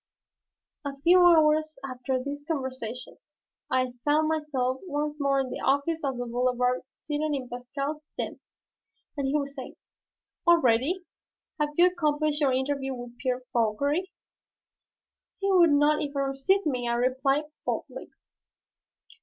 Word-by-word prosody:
A 280 -1 -5
few 360 +2 +7
hours 310 -3 +4
after 255 0 -2
this 280 +3 -5
conversation, 260 -6 -4 0.5
I 255 -1 +1
found 305 +1 +3
myself 270 -5 -1
once 295 -1 -2
more 275 -1 +2
in 260 -2 -5
the - - -4
office 285 +4 +1
of 270 -3 -1
the 245 - -3
Boulevard, 250 +1 +1 0.2
seated 300 0 -2
in 260 -2 -4
Pascal's 275 +5 -5
den, - - -4 0.8
and 280 -2 -1
he 275 - 0
was 280 -1 -3
saying, 265 -3 -8 0.7
"Already? 330 +2 +3 0.5
Have 300 0 +1
you 350 - +7
accomplished 305 -4 +1
your 280 -2 +4
interview 270 0 -1
with 245 -1 -9
Pierre 255 -1 -1
Fauchery?" 280 - +1 1.3
"He 395 0 +1
would 350 -3 +6
not 295 +1 +4
even 285 -1 -3
receive 275 +9 +1
me," 250 -5 -1
I - - +1
replied, 265 +4 +1 0.2
boldly. - - -4
280 Hz, 135 wpm, -27 LUFS, 255-305 Hz, 1.3 s, few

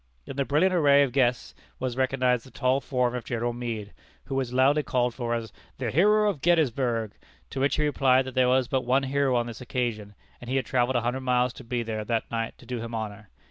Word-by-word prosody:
In - - -7
the 140 0 0
brilliant 165 +8 +2
array 145 -5 +5
of 135 - -1
guests 125 -2 +1 0.2
was 130 -2 -3
recognized 130 -2 +1
the 130 - -14
tall 130 +1 0
form 125 -3 0
of 125 -2 -4
General 120 0 -2
Meade, 115 -4 -5 0.3
who 135 - -7
was 135 -2 -1
loudly 135 +4 +3
called 125 -4 0
for 120 -2 -2
as 115 -1 -5 0.2
"the 125 -4 -2
hero 210 - +4
of 195 -10 -1
Gettysburg," 130 -9 +1 0.4
to 135 - -4
which 140 +2 +2
he 155 - 0
replied 135 -3 +3
that 130 - -7
there 130 -1 +3
was 130 -1 +3
but 130 - 0
one 130 +3 +2
hero 135 -1 +1
on 120 -1 +1
this 120 +1 -8
occasion, 115 -5 -3 0.3
and 125 - -9
he 130 - -1
had 135 - +1
travelled 130 -1 +1
a 120 - +2
hundred 125 +3 -2
miles 125 -1 +1
to - - -11
be 120 0 -2
there 110 -1 -4
that 115 +1 -2
night 115 -1 -3
to - - -16
do 125 0 -4
him 115 0 -5
honor. 110 -2 -6
125 Hz, 235 wpm, -26 LUFS, 120-135 Hz, 0.4 s, array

